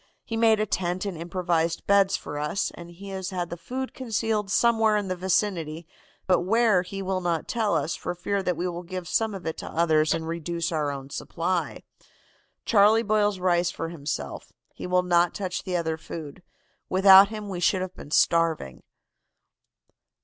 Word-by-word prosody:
He 225 - -5
made 225 -1 +4
a 215 - +1
tent 185 -1 -2
and 195 -3 -3
improvised 170 -1 -1
beds 200 -1 +4
for 145 - -6
us, 150 +6 -1
and 170 0 -10
he 190 +3 -11
has 190 -1 -4
the 175 -2 -4
food 255 +10 -5
concealed 225 -4 -2
somewhere 225 0 +3
in 205 -2 -3
the 185 - -1
vicinity, 175 -3 -1 0.4
but 185 - +3
where 215 +1 +3
he 195 +2 -6
will 190 0 -1
not 170 -2 -1
tell 220 -3 0
us, 150 +3 -1
for 180 - -5
fear 200 +3 -2
that 180 -3 -1
we 175 +2 -1
will 175 0 -4
give 180 0 -6
some 220 +2 0
of 190 - -9
it 160 - -3
to - - -6
others 155 -2 +2
and 160 0 -4
reduce 170 +1 -3
our 155 -3 0
own 140 -1 -7
supply. 175 +4 -3 0.8
Charlie 220 0 +5
boils 210 -2 +1
rice 175 -1 +2
for 165 -1 -5
himself. 150 -4 -5 0.2
He - - -7
will 180 0 +2
not 175 -1 +2
touch 185 -2 -4
the 180 -2 -1
other 160 -2 -2
food. 155 -1 -8 0.5
Without 190 +1 +8
him 215 -1 -6
we 185 -3 -4
should 185 +2 +2
have 185 -1 -6
been 145 - -11
starving. 165 - +1
180 Hz, 180 wpm, -26 LUFS, 170-200 Hz, 0.8 s, Without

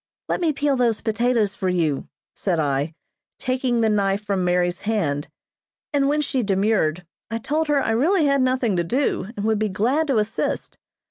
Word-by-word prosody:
"Let - - -1
me 330 -3 +3
peel 285 -1 +1
those 240 -4 +2
potatoes 225 -2 +1
for 190 -1 -2
you," 160 -6 0 0.3
said 180 -5 -1
I, 145 +1 -1 0.4
taking 255 -2 0
the 225 - +3
knife 200 -1 +1
from 195 -3 0
Mary's 175 0 +1
hand; 160 -10 -1 0.7
and 280 -1 +2
when 300 +1 +2
she 270 -3 -1
demurred, 195 -5 +1 0.2
I 225 - -2
told 305 +7 -1
her 295 -1 +2
I 225 - 0
really 310 - +3
had 280 -1 +3
nothing 255 -5 +1
to 175 - +2
do, 245 +1 0
and 205 - -2
would 220 -1 +2
be 215 -1 0
glad 250 +11 +1
to 270 -5 +2
assist. 215 +1 -2
220 Hz, 185 wpm, -23 LUFS, 185-260 Hz, 0.7 s, me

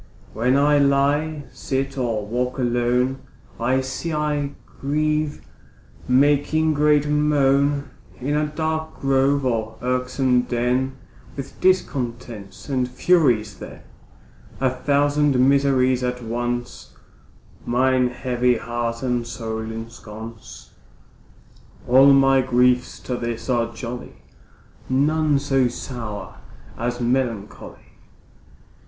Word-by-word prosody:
When 125 +5 +2
I 145 +1 +4
lie, 145 +2 +2
sit, 135 0 -3
or 115 -5 -1
walk 125 +4 -2
alone, 125 +1 +1 0.4
I 130 +3 +1
sigh, 130 +5 -4 0.2
I 145 -1 -2 0.3
grieve, 150 +1 -1 0.6
making 145 +4 +3
great 150 0 +3
moan, 145 -1 +2 0.3
In 140 +4 -1
a 150 0 +1
dark 160 +1 -3
grove, 135 +1 +2
or 110 -3 -1
irksome 125 0 +1
den, 125 +2 -1 0.4
With 135 -2 -8
discontents 120 - -1
and 130 -3 -1
Furies 125 - +2
then, - - -10 0.8
A 130 -1 +2
thousand 145 +1 +2
miseries 130 -1 +3
at 125 0 -3
once 120 +1 -4 0.7
Mine 130 +1 +2
heavy 125 -1 0
heart 120 +1 -3
and 120 -2 -1
soul 110 -1 -5
ensconce, 110 0 -9 1.2
All 135 +3 +7
my 135 -1 +5
griefs 125 0 +2
to 125 - -3
this 120 +1 -3
are 115 -1 0
jolly, 120 +1 -7 0.7
None 150 +3 +2
so 135 -2 +2
sour 115 -4 -6 0.4
as 120 +1 -3
melancholy. 120 -4 -3
130 Hz, 100 wpm, -22 LUFS, 120-140 Hz, 1.2 s, All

